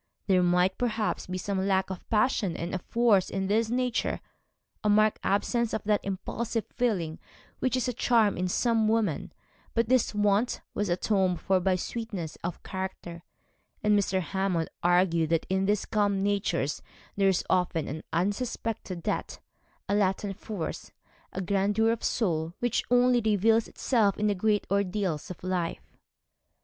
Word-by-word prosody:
There 185 -2 +4
might, 180 +1 +2
perhaps, 225 -3 -1
be 185 0 -3
some 190 +1 -2
lack 190 -1 +1
of 185 - -8
passion 210 -5 +1
and 170 +1 -4
of 185 - -2
force 230 -5 +2
in 195 0 -2
this 220 +3 +1
nature, 250 0 0 0.6
a 210 - +2
marked 215 +1 +4
absence 235 +3 +1
of 215 - -3
that 210 -1 +2
impulsive 215 +4 -3
feeling 185 -10 -1 0.4
which 255 -1 +1
is 255 - 0
a 250 - -1
charm 225 -3 +3
in 180 +1 -1
some 225 +3 +2
women: 215 -8 0 0.4
but 230 -1 +1
this 255 -4 +2
want 205 +3 +2
was 205 -2 -1
atoned 185 0 +1
for 190 +3 +2
by 185 +1 +2
sweetness 190 -4 -4
of 175 0 -4
character, 185 -3 -6 0.6
and 210 0 +4
Mr. 190 -2 +1
Hammond 180 0 -1
argued 175 -2 +3
that 165 -1 +1
in 190 0 +1
these 205 0 +1
calm 205 -2 +1
natures 195 -7 0 0.3
there 195 -1 +3
is 185 - 0
often 180 -3 +1
an 155 +3 -5
unsuspected 200 0 -2
depth, - - -3 0.5
a - - 0
latent 195 0 +1
force, 205 -4 -6 0.4
a 190 - -4
grandeur 200 +4 +2
of 230 - -3
soul, 165 -6 0
which 245 -2 0
only 245 0 +4
reveals 220 +1 +3
itself 220 -6 +1
in 210 - 0
the 210 - +3
great 205 +2 +1
ordeals 195 -4 -1
of 180 - -9
life. 180 -2 -3
200 Hz, 160 wpm, -28 LUFS, 180-220 Hz, 0.6 s, There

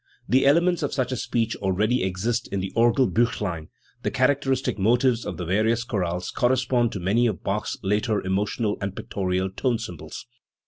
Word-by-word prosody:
The 130 +2 +3
elements 170 +4 +3
of 145 - -2
such 130 -2 -1
a - - 0
speech 115 -2 -1
already 105 +6 +1
exist 95 +6 -1
in 100 - -3
the 95 +1 -4
Or 120 +1 +5
gel 130 +2 +3
buchlein: 90 -10 -1 0.3
the - - -1
characteristic 130 -3 +1
motives 120 +3 +2
of - - -4
the 90 - -4
various 110 +6 +1
chorales 90 -6 -2
correspond 125 -1 +1
to 100 - -4
many 105 +7 +2
of 105 - -3
Bach's 100 +2 -2
later 105 +2 +1
emotional 105 +3 -1
and 100 -1 -3
pictorial 95 -1 -2
tone 115 +5 0
symbols. 100 -8 -8
110 Hz, 175 wpm, -24 LUFS, 95-125 Hz, 0.3 s, Or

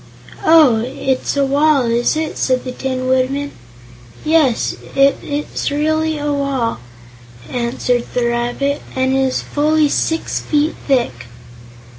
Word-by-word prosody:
"Oh; 310 -8 +6
it's 260 +2 -2
a 280 - +3
wall, 285 0 +3
is 235 +5 +1
it?" 315 -1 -2
said 255 -1 0
the 255 - -5
Tin 255 0 -3
Woodman. 260 +2 0 0.7
"Yes, 305 -6 +2 0.2
it 275 0 +4
is 290 +1 -3
really 315 +2 0
a 295 0 -1
wall," 275 - -1 0.7
answered 245 0 -1
the 245 -1 +1
rabbit, 240 +4 -1
"and 260 0 +1
it 270 - +2
is 265 -1 0
fully 305 0 +1
six 325 +3 -1
feet 300 +1 0
thick." 185 - 0
275 Hz, 130 wpm, -17 LUFS, 255-295 Hz, 0.7 s, Oh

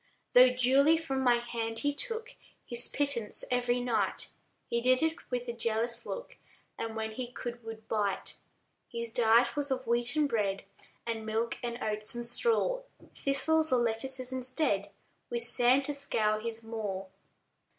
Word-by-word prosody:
Though 250 +1 +8
duly 265 +5 +4
from 270 -5 -2
my 245 -2 +4
hand 230 -1 -3
he 290 0 +1
took 460 +7 -3 0.3
His 240 0 +2
pittance 275 -7 +1
every 245 0 +1
night, 245 -2 -1 0.4
He 235 - -1
did 255 +4 +3
it 320 +1 -2
with 245 -1 -3
a 235 - -3
jealous 235 +1 -1
look, - - -7 0.4
And, 225 -1 -5
when 220 0 -3
he 245 +3 -5
could, 240 -1 -7
would 225 -1 -9
bite. 205 -3 -1 0.5
His 235 -1 -5
diet 235 +1 +4
was 290 -1 +2
of 260 -1 -2
wheaten 240 +6 +2
bread, 205 -7 -1 0.4
And 225 -1 -3
milk, 220 +2 -2
and 240 -1 -4
oats, 215 +1 -2
and 240 0 -1
straw; 470 - +3 0.3
Thistles, 315 +3 +2
or 255 - +4
lettuces 255 +3 -2
instead, 255 -5 -1 0.4
With 235 -1 0
sand 250 +3 +3
to 290 - 0
scour 215 -6 0
his 230 0 -4
maw. 210 -4 -4
240 Hz, 155 wpm, -30 LUFS, 225-265 Hz, 0.5 s, Though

